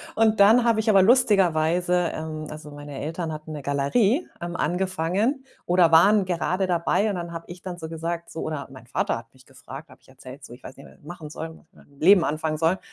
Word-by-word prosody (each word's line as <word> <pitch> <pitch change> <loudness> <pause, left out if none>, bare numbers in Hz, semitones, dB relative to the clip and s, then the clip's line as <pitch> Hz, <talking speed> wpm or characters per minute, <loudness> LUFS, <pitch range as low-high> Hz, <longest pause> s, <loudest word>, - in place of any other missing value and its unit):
Und 220 -1 +2
dann 220 +5 +6
habe 230 -2 +2
ich 220 0 0
aber 195 -2 +6
lustigerweise, 180 -6 +2
ähm 155 -1 -6
also, 150 -1 -10
meine 145 -1 -9
Eltern 160 +1 -4
hatten 155 +1 -9
'ne 150 - -6
Galerie, 195 - +1
ähm, 175 0 -5
angefangen 190 - -1 0.2
oder 175 -2 +3
waren 195 +5 +5
gerade 185 +1 -1
dabei 180 +4 +1
und 200 - -2
dann 170 -1 -6
habe 165 0 -7
ich 175 0 -10
dann 185 -2 -7
so 160 -2 -7
gesagt 170 +1 -5
so 165 - -6
oder 155 -3 -4
mein 130 -3 -14
Vater 125 - -1
hat 115 0 -13
mich 130 0 -21
gefragt, 135 +3 -12
habe - - -17
ich - - -27
erzählt 130 +1 -12
so, - - -12
ich 120 - -15
weiß - - -11
nicht, 135 - -13
was - - -19
ich - - -28
machen 160 0 -9
soll, 160 +2 -6
und 160 - -13
was - - -23
ich - - -43
mit - - -20
meinem 140 0 -23
Leben 185 +1 +5
anfangen 155 +1 -2
soll. 165 +2 +2
Hat 190 - -8
165 Hz, 245 wpm, -24 LUFS, 150-190 Hz, 0.2 s, dann